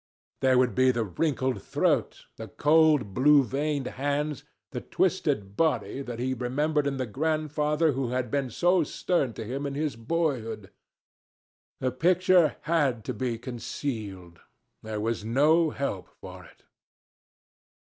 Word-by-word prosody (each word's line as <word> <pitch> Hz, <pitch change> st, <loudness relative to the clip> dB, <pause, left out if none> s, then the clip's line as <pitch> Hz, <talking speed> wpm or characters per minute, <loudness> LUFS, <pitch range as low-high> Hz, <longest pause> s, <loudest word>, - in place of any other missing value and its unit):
There 130 Hz, -1 st, +3 dB
would 125 Hz, -1 st, +3 dB
be 130 Hz, 0 st, +4 dB
the 120 Hz, -2 st, +1 dB
wrinkled 130 Hz, -, -1 dB
throat, -, -, 0 dB
the -, -, -8 dB
cold, 150 Hz, -8 st, +3 dB
blue 145 Hz, +3 st, +5 dB
veined 140 Hz, +2 st, -2 dB
hands, 145 Hz, +2 st, -2 dB, 0.3 s
the -, -, -4 dB
twisted 100 Hz, -1 st, -1 dB
body, 150 Hz, -2 st, 0 dB
that 120 Hz, -4 st, -6 dB
he 130 Hz, +2 st, -1 dB
remembered 145 Hz, +4 st, 0 dB
in 135 Hz, -1 st, -2 dB
the 130 Hz, -, -1 dB
grandfather 150 Hz, +4 st, 0 dB
who 130 Hz, -2 st, -2 dB
had 125 Hz, -2 st, -2 dB
been 140 Hz, -3 st, 0 dB
so 175 Hz, +8 st, +2 dB
stern 145 Hz, -4 st, -1 dB
to 110 Hz, +1 st, -7 dB
him 135 Hz, +5 st, -3 dB
in 140 Hz, -, -5 dB
his 150 Hz, -2 st, -2 dB
boyhood. 115 Hz, -, -2 dB, 1.1 s
The 130 Hz, -, 0 dB
picture 180 Hz, +4 st, +3 dB
had 145 Hz, -9 st, 0 dB
to -, -, -3 dB
be 125 Hz, -3 st, -2 dB
concealed. 110 Hz, -7 st, -6 dB, 0.4 s
There 110 Hz, -1 st, -5 dB
was 110 Hz, 0 st, -2 dB
no 150 Hz, +8 st, +3 dB
help 140 Hz, -11 st, -4 dB
for -, -, -10 dB
it. -, -, -20 dB
135 Hz, 140 wpm, -27 LUFS, 120-150 Hz, 1.1 s, blue